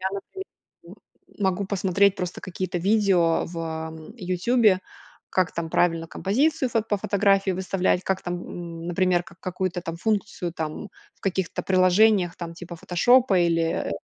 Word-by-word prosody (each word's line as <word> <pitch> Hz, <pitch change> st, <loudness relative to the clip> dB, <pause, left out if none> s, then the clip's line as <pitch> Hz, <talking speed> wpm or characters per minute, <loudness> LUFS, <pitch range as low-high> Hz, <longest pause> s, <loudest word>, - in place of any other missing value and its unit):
Я 190 Hz, -, -2 dB
например, 290 Hz, -, -7 dB, 0.4 s
м -, -, -12 dB, 0.4 s
могу 190 Hz, 0 st, 0 dB
посмотреть 200 Hz, 0 st, +2 dB
просто 180 Hz, -2 st, -4 dB
какие-то 185 Hz, -1 st, -4 dB
видео 190 Hz, -4 st, +2 dB
в, 170 Hz, 0 st, -7 dB
ам, 160 Hz, +2 st, -6 dB
"Ютубе". 190 Hz, +1 st, +2 dB, 0.5 s
Как 185 Hz, -2 st, +1 dB
там 165 Hz, -1 st, -3 dB
правильно 165 Hz, -2 st, +1 dB
композицию 260 Hz, -, +1 dB
фот 225 Hz, -1 st, -1 dB
по 205 Hz, -, +1 dB
фотографии 195 Hz, -1 st, +2 dB
выставлять, 185 Hz, 0 st, 0 dB
как 190 Hz, 0 st, -1 dB
там, 175 Hz, 0 st, -3 dB
м, 170 Hz, -1 st, -7 dB
например, 175 Hz, 0 st, +1 dB
какую-то 180 Hz, +1 st, -4 dB
там 165 Hz, -1 st, -5 dB
функцию 190 Hz, -3 st, -2 dB
там, 160 Hz, +6 st, -5 dB, 0.3 s
в -, -, -36 dB
каких-то 190 Hz, -2 st, -2 dB
приложениях, 185 Hz, 0 st, +4 dB
там, 170 Hz, -1 st, -7 dB
типа 175 Hz, 0 st, -9 dB
"Фотошопа" 215 Hz, +5 st, +3 dB
или, 165 Hz, -, +1 dB
185 Hz, 145 wpm, -24 LUFS, 170-200 Hz, 0.5 s, приложениях